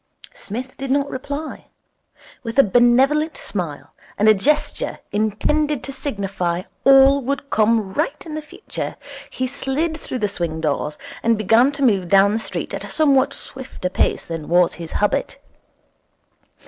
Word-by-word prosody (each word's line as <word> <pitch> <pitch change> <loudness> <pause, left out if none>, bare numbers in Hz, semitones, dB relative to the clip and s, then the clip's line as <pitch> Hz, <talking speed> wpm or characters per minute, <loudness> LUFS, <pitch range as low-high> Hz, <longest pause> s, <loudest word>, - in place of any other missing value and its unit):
Psmith 250 +5 -7
did 270 0 -5
not 280 +1 +1
reply. 285 +4 -6 0.7
With 230 +1 -6
a 275 - +8
benevolent 260 - +3
smile 170 -8 -5 0.2
and 210 - +3
a 215 - +8
gesture 295 +9 0
intended 250 +7 0
to 275 - -5
signify 195 -10 -3 0.2
all 270 +1 +6
would 280 +2 -3
come 215 -2 +2
right 295 - -2
in 315 - -7
the 310 - -3
future, 305 - -6 0.3
he 255 - -3
slid 280 +5 -1
through 300 - -5
the 210 -4 0
swing 170 -5 -3
doors, 150 -1 -2 0.2
and 230 -1 +2
began 225 +6 +4
to 280 -1 -3
move 195 -8 +2
down 195 +2 +5
the 220 - 0
street - - -5
at - - -4
a - - -6
somewhat 280 -3 +3
swifter 260 -10 -6
pace - - 0
than 165 -2 -6
was 175 0 +4
his 165 -2 -7
habit. 210 - 0
245 Hz, 155 wpm, -21 LUFS, 195-280 Hz, 0.7 s, a